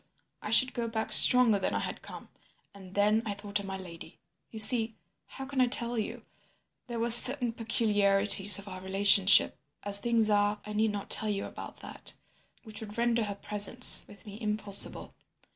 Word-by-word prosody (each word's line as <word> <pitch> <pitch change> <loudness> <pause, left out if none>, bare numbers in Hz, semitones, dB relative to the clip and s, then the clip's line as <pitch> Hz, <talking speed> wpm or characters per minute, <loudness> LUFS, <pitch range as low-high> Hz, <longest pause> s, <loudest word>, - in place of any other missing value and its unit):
I - - -9
should 255 +4 +3
go 235 -1 -6
back 225 -1 -6
stronger 245 -5 +4
than 185 - -5
I - - -3
had - - -8
come. - - -14 0.4
And 190 -2 -17
then 210 +2 -1
I 210 -3 -7
thought 200 0 -5
of 200 - -10
my 195 0 -8
lady. 170 -3 -14 0.3
You 220 - -13
see—how 225 +3 -2
can 270 -1 -4
I 250 - +1
tell 240 -1 -4
you? 230 +1 -8 0.6
There 240 -1 -8
were 235 +1 -2
certain 245 0 +5
peculiarities 205 -3 +3
of 200 0 -10
our 185 -1 -11
relationship—as 195 -2 +1
things 230 -1 -2
are 205 0 -1
I 210 - -10
need 220 +1 -2
not 205 -1 -9
tell 220 - +1
you 200 -1 -5
about - - -13
that—which 220 -2 -13
would 210 0 -12
render 235 -1 -2
her 200 -1 -8
presence 210 +4 +2
with 205 -2 -19
me 210 +2 -14
impossible. 210 -2 0
210 Hz, 175 wpm, -26 LUFS, 200-230 Hz, 0.6 s, certain